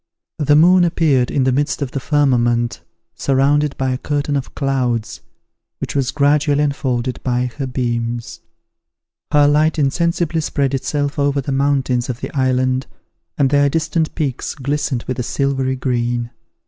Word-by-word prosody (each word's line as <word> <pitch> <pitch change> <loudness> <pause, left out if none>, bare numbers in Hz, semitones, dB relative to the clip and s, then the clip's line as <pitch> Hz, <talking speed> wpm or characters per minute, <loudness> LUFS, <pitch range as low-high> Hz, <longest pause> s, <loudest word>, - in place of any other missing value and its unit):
The 145 -1 +3
moon 180 +4 +6
appeared 155 -7 +2
in 140 - +1
the 130 - +2
midst 145 +3 0
of 130 - -5
the 135 - -3
firmament, 120 -5 +1 0.3
surrounded 140 +2 +1
by 130 -1 0
a 125 - -2
curtain 145 0 -1
of 135 -1 -4
clouds, 125 -5 -1 0.6
which - - -5
was 135 -2 +1
gradually 145 0 +2
unfolded 130 -4 -1
by 125 -1 -1
her 135 - -2
beams. 120 -2 -3 0.9
Her 145 -1 +5
light 155 +2 +2
insensibly 165 +3 0
spread 140 -2 -1
itself 145 +2 -2
over 140 0 +1
the 140 +1 -3
mountains 135 -2 +1
of 125 -1 -4
the - - -7
island, 130 -1 +1 0.5
and 135 -1 +2
their 145 0 +4
distant 160 +1 -1
peaks 140 -6 -3
glistened 140 -2 -2
with 130 0 -4
a - - 0
silvery 135 0 -1
green. 120 -2 -1
135 Hz, 150 wpm, -18 LUFS, 125-145 Hz, 0.9 s, moon